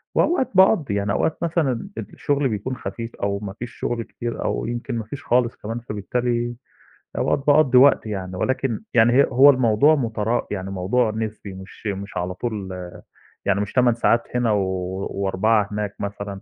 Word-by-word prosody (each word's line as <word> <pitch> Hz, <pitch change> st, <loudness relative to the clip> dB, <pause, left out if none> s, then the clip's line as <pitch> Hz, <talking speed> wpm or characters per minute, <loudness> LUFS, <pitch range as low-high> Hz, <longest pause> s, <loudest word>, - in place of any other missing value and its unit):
وأوقات 330 Hz, -7 st, +2 dB
باقضّي، 185 Hz, -, +4 dB
يعني 100 Hz, 0 st, 0 dB
أوقات 160 Hz, -, 0 dB
مثلًا 165 Hz, -, 0 dB
الشُغل 145 Hz, -6 st, -1 dB
بيكون 110 Hz, +5 st, -3 dB
خفيف 115 Hz, 0 st, -6 dB
أو 100 Hz, 0 st, -2 dB
ما 100 Hz, -2 st, -6 dB
فيش 120 Hz, 0 st, -6 dB
شُغل 120 Hz, -1 st, -2 dB
كتير 120 Hz, +1 st, -5 dB
أو -, -, -1 dB
يمكن 120 Hz, +1 st, -4 dB
ما 110 Hz, -, -3 dB
فيش 140 Hz, +7 st, -8 dB
خالص 120 Hz, -1 st, +2 dB
كمان، 115 Hz, +3 st, -5 dB
فبالتالي 120 Hz, +2 st, -2 dB, 0.6 s
أوقات -, -, +1 dB
باقضّي 145 Hz, -4 st, +5 dB
وقت 140 Hz, -2 st, +6 dB
يعني، 95 Hz, -3 st, -5 dB
ولكن 130 Hz, +2 st, -1 dB
يعني 120 Hz, 0 st, +5 dB
هي 140 Hz, +2 st, +6 dB
هو 135 Hz, +3 st, +7 dB
الموضوع 130 Hz, +3 st, +4 dB
مترا 115 Hz, -2 st, -1 dB
يعني 95 Hz, -1 st, -4 dB
موضوع 105 Hz, +5 st, +1 dB
نسبي 110 Hz, -2 st, -5 dB
مش 95 Hz, +3 st, -10 dB
مش 100 Hz, 0 st, -4 dB
على 90 Hz, +1 st, -2 dB
طول 105 Hz, -2 st, -4 dB, 0.8 s
يعني 100 Hz, -, +2 dB
مش 105 Hz, -, -4 dB
8 125 Hz, -2 st, +4 dB
ساعات 115 Hz, 0 st, +2 dB
هنا 120 Hz, -3 st, +2 dB
و 95 Hz, 0 st, -2 dB
و4 95 Hz, +3 st, -3 dB, 0.3 s
هناك 105 Hz, -1 st, -3 dB
مثلًا. 100 Hz, -1 st, -5 dB
115 Hz, 170 wpm, -22 LUFS, 100-125 Hz, 0.8 s, هو